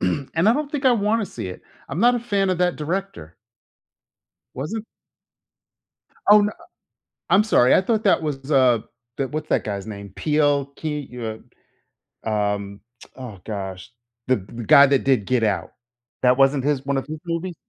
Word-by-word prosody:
and 130 +10 -2 0.2
I - - +6
don't 290 +1 -3
think 275 -2 -1
I 255 - +6
wanna 215 -1 +1
see 110 - -7
it. 90 - -9 0.3
I'm 150 +6 -4
not 245 +2 +5
a - - 0
fan 200 -5 0
of 185 - 0
that 180 -1 +1
director. 155 - -5 1.2
Wasn't 210 - -4 1.4
Oh, 210 +1 +8
n 205 - +1
uh - - -10 0.8
I'm 200 +2 +5
sorry, 130 - +4
I - - +5
thought 220 +2 0
that 195 - +3
was, 145 -2 -4
uh 130 -4 +4 0.4
the 135 - -1
what's 155 0 -5
that - - +1
guy's 100 -1 -5
name? 100 -2 -8
Peele 145 -2 +1
Key? 150 -1 -3
You, 115 -3 -6 0.8
uh, - - -3
um, 100 -1 -2 0.4
oh 125 -7 -9
gosh. 95 -3 -6 0.4
The 130 - +3
the 110 +4 -8
guy 140 +7 +8
that 140 -1 +1
did 130 -6 +2
Get 125 -2 +1
Out. 105 -2 -1 0.5
That 125 0 +4
wasn't 135 0 +3
his 140 -2 0
one 140 0 -1
of 135 - -2
his 155 +1 -6
movies? 170 +1 -3
140 Hz, 175 wpm, -22 LUFS, 115-185 Hz, 1.4 s, Oh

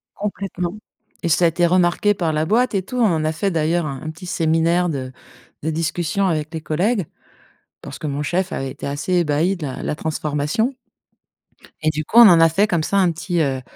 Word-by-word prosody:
Complètement 195 -3 -4 0.5
et 170 - 0
ça 165 +3 +3
a - - +7
été 175 +2 +1
remarqué 180 +3 +3
par 170 -5 -1
la 155 0 0
boîte 230 +5 +1
et 190 - 0
tout, 250 +7 -6
on 170 -9 +2
a 155 - +1
fait, 195 +5 -1
d'ailleurs 165 0 0
un 135 -1 -6
un 155 - -4
petit 165 +3 -11
séminaire 165 +1 +1
de 130 -4 -4 0.5
de 160 - -1
discussion 165 +4 -1
avec 155 -3 -2
les 160 - -4
collègues. 185 +6 0 0.8
Parce - - -8
que - - -5
mon 145 0 -2
chef 180 +5 -1
avait 135 0 -3
été - - -8
assez 145 +6 -2
ébahi 170 +2 +1
de 160 -4 -5
la 130 - -6
de - - -5
la - - -1
transformation 155 - -1 1.1
et 155 - +2
du 155 0 -3
coup, 225 - -1
on 235 -1 +11
en 170 -2 +6
a 165 0 +6
fait 200 +6 +2
comme 170 -5 0
ça 200 - 0
un 185 -3 +3
petit, 170 +1 -2
heu, 135 -3 -1
165 Hz, 220 wpm, -20 LUFS, 155-185 Hz, 1.1 s, on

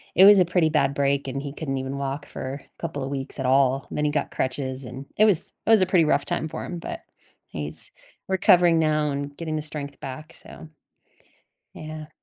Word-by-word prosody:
it 190 - +8
was 205 -1 +9
a 180 - +5
pretty 175 -2 +2
bad 140 -3 +2
break, 140 0 0
and 135 +1 -3
he 140 -1 -6
couldn't 135 -3 -3
even 135 +1 -4
walk 140 +1 -4
for 135 +2 -6 0.2
couple 140 - -4
of 135 - -4
weeks 135 0 -4
at 130 - -1
all. 135 0 +3
Then 150 - -1
he 150 - +1
got 150 - -1
crutches, 130 0 -3
and 135 +3 -8
it 215 - +6
was 200 -7 +2
it - - -2
was 220 - +7
a 185 - +3
pretty 180 -3 +4
rough 150 - +2
time 155 - -2
for 160 0 -6
him, 175 - -5
but 170 - -6 0.5
he's 75 -1 -6 0.4
recovering 180 -3 +4
now 155 -1 +2
and 140 0 -4
getting 160 -1 -4
the 155 - -2
strength 145 -2 -6
back, 135 +3 -8
so 160 - -12 1.1
Yeah. 155 0 -8
145 Hz, 210 wpm, -24 LUFS, 135-160 Hz, 1.1 s, was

